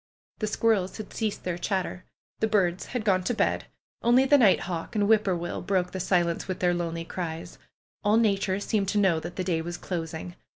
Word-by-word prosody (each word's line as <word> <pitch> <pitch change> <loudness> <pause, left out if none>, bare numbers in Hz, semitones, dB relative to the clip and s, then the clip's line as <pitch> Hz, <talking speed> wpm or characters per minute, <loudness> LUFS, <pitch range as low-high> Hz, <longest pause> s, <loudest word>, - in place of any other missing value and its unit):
The 215 - -1
squirrels 210 -3 +1
had 215 -2 -8
ceased 215 -3 -2
their 175 -1 -3
chatter. 185 -1 -2 0.3
The 220 - +2
birds 190 -4 +1
had 245 -4 -3
gone 185 -3 +3
to 240 - 0
bed; - - +1 0.4
only 245 +3 +5
the 285 +1 +5
night 210 -6 +5
hawk 175 +3 -5
and 205 -1 +2
whip 215 -1 +4
poor 190 -2 +1
will 175 0 -4
broke 180 -1 0
the 190 - -4
si 180 -1 +3
lence 170 -1 -3
with 185 -1 -2
their 175 -1 +2
lonely 165 -1 -3
cries. 165 -2 -5 0.4
All 210 +1 +4
nature 195 -3 +2
seemed 205 -1 0
to 210 - 0
know 190 -5 +3
that 175 +2 -7
the 185 - -2
day 170 -3 0
was 175 +1 -5
closing. 165 0 -5
185 Hz, 215 wpm, -27 LUFS, 175-210 Hz, 0.4 s, only